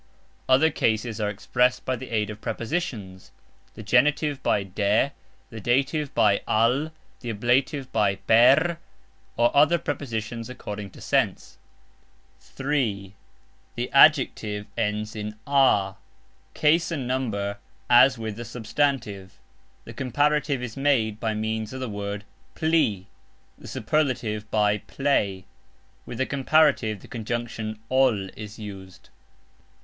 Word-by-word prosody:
Other 145 +5 +5
cases 110 -4 -1
are 105 - 0
expressed 125 +5 0
by 130 - 0
the 130 +1 -9
aid 110 -2 -1
of 105 +1 -10
prepositions 110 - -4 0.5
(the 110 - -9
genitive 140 +5 +2
by 100 - +1
"de", 100 +7 +1 0.4
the 115 - -7
dative 135 +6 0
by 100 -2 +3
"al", 125 +8 +2 0.3
the 120 - -6
ablative 125 +5 0
by 105 -3 +2
"per", 130 - +4 0.6
or 120 0 +3
other 150 +4 +5
prepositions 115 -6 -4
according 105 -5 -7
to - - -15
sense). - - -1 0.8
(3) 120 -9 -2 0.6
The - - -3
ADJECTIVE 105 -1 +4
ends 105 +1 -2
in 105 0 -5
"a". 130 -9 +3 0.6
Case 155 +2 +3
and 140 -7 -3
number 105 -6 -2 0.3
as 125 +1 +6
with 110 -2 -5
the 120 - -5
substantive. 115 -4 -2 0.5
The - - -9
Comparative 145 +1 0
is 115 -3 -6
made 120 -7 +1
by 110 -1 -1
means 110 +1 -3
of 130 - -6
the 130 - -3
word 100 -1 -5 0.3
"pli", 155 - +1 0.5
the - - -13
Superlative 115 -5 -1
by 105 -1 +2
"plej"; 100 -10 -1 0.6
with 120 - -6
the 130 - +1
Comparative 140 -7 +2
the - - -14
conjunction 115 -1 -4
"ol" 120 -7 +2
is 105 +2 -10
used. 95 -4 -10
115 Hz, 125 wpm, -25 LUFS, 105-135 Hz, 0.8 s, as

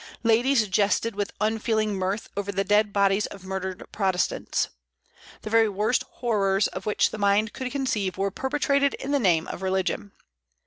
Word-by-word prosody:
Ladies 230 +1 +3
jested 205 +4 +1
with 205 0 -3
unfeeling 215 0 0
mirth 190 +3 -2
over 200 0 -2
the 195 0 0
dead 210 +1 +3
bodies 200 0 +2
of 195 -2 -11
murdered 190 -1 -5
Protestants. 190 -3 0 0.7
The 215 - -6
very 225 -1 +4
worst 210 +5 +1
horrors 200 -4 +1
of 190 +3 -7
which 210 - +2
the 215 - -6
mind 205 +1 +2
could 255 -1 -4
conceive 215 -10 -1
were 195 +1 0
perpetrated 280 +3 +1
in 275 - -5
the 285 - +3
name 175 -8 +2
of - - -6
religion. 190 +1 -1
205 Hz, 165 wpm, -25 LUFS, 195-225 Hz, 0.7 s, very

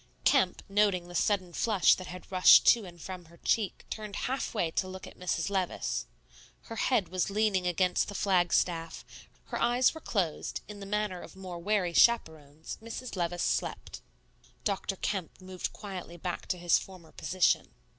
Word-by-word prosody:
Kemp, - - +3
noting 195 -3 +2
the - - -9
sudden 185 0 +1
flush 210 -2 +4
that 185 - -5
had 180 +1 -10
rushed 185 -1 +8
to 230 -4 +5
and 175 -1 -12
from 180 +1 -7
her 170 +1 -18
cheek, 210 +3 -1
turned 210 -2 -5
halfway 225 -9 -1
to 185 - -1
look 185 0 -8
at - - -12
Mrs. 180 0 -2
Levice. 115 - -1 0.5
Her 225 - -9
head 220 -8 +1
was 185 +1 0
leaning 200 -3 +1
against 180 +1 +1
the 205 - -7
flag 180 -4 +2
staff; 165 -2 0 0.4
her - - -3
eyes 245 +1 +3
were 320 - -9
closed, 185 - -2
in 210 -1 -9
the 200 - -8
manner 210 -3 -1
of - - -12
more 185 -2 -7
wary 185 -1 0
chaperones, 160 -9 +2
Mrs. 230 +2 -6
Levice 175 -1 -1
slept. - - -2 0.6
Dr. 195 -1 -1
Kemp 190 -2 -3
moved 185 -1 -5
quietly 185 -4 -8
back 175 +1 -4
to 180 - -1
his 175 -1 +3
former 185 -4 -12
position. 180 - +1
185 Hz, 170 wpm, -30 LUFS, 175-205 Hz, 0.6 s, rushed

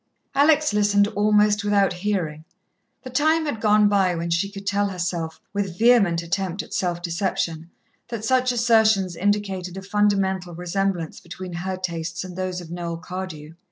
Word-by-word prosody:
Alex 300 -2 +4
listened 205 -1 +3
almost 210 0 +3
without 200 -2 +2
hearing. 175 -5 -2 0.6
The 255 - -8
time 315 +4 +2
had 230 -8 -3
gone 210 -1 +5
by 195 -3 +2
when 170 0 -3
she 175 +4 +1
could 200 0 -9
tell 200 0 +1
herself, 175 -3 -3
with 195 -4 -2
vehement 200 -8 +4
attempt 190 +1 -2
at - - -12
self 175 -2 -1
deception, 170 -2 -2 0.4
that 230 -3 -5
such 255 +1 +2
assertions 220 -6 +3
indicated 195 -2 -1
a 190 - -6
fundamental 195 -3 0
resemblance 180 -1 -2
between 180 +1 -8
her 185 +2 -3
tastes 170 -2 -4
and 185 -1 -8
those 185 -1 -3
of 165 -1 -11
Noel 170 -1 -4
Cardew. 175 -3 -7
190 Hz, 160 wpm, -23 LUFS, 175-210 Hz, 0.6 s, gone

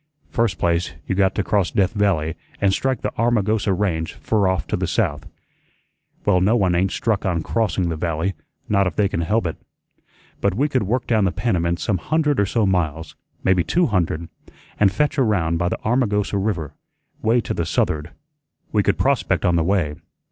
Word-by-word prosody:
First 115 -6 0
place, 85 0 0
you - - -1
got 95 0 +2
to 105 - 0
cross 100 -3 +1
Death 95 -2 +1
Valley 95 -7 +1 0.3
and 100 -1 +2
strike 130 +4 0
the - - -2
Armagosa 110 -3 +2
Range 90 -4 -1
fur 105 -3 0
off 95 -1 0
to - - -2
the - - -1
south. - - -1 1.0
Well, 90 - +3
no 105 +5 +3
one 95 -6 +2
ain't 95 +2 +1
stuck 110 -4 0
on 85 -4 0
crossing 105 -5 0
the 80 - -2
Valley, 80 +3 -1 0.3
not 100 -2 +2
if 85 - -4
they 100 - +3
can 85 - -2
help 105 +5 +1
it. 80 - -3 0.8
But - - +1
we 140 +7 +2
could 130 -4 0
work 120 +5 -1
down 110 -4 +2
the 95 - +1
Panamint 85 -7 0
some 100 -5 0
hundred 150 - +1
or 100 - +2
so 110 +1 +1
miles, 80 -4 -1 0.3
maybe 95 -2 +3
two 175 - +2
hundred, 85 - -1 0.5
an' 100 - +5
fetch 145 +9 0
around 90 -9 +2
by 85 +1 0
the - - -2
Armagosa 105 -4 +1
River, 90 -8 -2 0.5
way 115 +3 +3
to - - -3
the 85 - -2
south'erd. 75 0 0 0.6
We 105 - +3
could 100 0 +1
prospect 135 -6 +1
on 90 -2 +3
the 85 - +2
way. 85 -4 +1
95 Hz, 190 wpm, -21 LUFS, 85-110 Hz, 1.0 s, an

